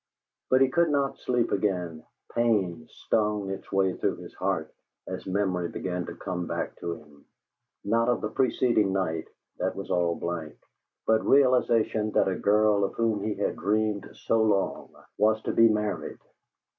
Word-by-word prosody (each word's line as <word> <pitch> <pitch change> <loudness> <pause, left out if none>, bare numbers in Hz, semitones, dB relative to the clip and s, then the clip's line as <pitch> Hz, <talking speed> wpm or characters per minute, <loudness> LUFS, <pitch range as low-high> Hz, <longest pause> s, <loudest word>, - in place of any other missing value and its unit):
But 130 +1 +4
he 135 - +5
could 170 +4 +2
not 140 -2 0
sleep 120 -2 0
again; 90 -5 -1 0.3
pain 95 -9 +1
stung 105 -2 -1
its 95 - -7
way 95 -1 +2
through - - -1
his - - -11
heart - - -2 0.3
as - - -6
memory 95 -3 0
began 90 -1 -4
to - - -7
come 90 -2 -4
back - - -3
to 85 0 -4
him, 75 -2 -17 0.6
not 115 +3 +2
of 120 - +1
the 110 - -2
preceding 120 -6 +2
night 80 -4 -1 0.3
that - - -1
was - - -6
all 85 -1 +2
blank, 85 -3 -4 0.5
but 110 0 +3
realization 120 -5 +3
that - - +4
the 95 - 0
girl 105 +1 +3
of 100 - -2
whom 115 -3 0
he 105 +1 -2
had - - -1
dreamed 105 +1 0
so 115 0 +1
long 105 -3 0 0.3
was 110 +1 +4
to - - -1
be 115 0 +6
married. 105 -1 -2
105 Hz, 165 wpm, -27 LUFS, 90-115 Hz, 0.6 s, be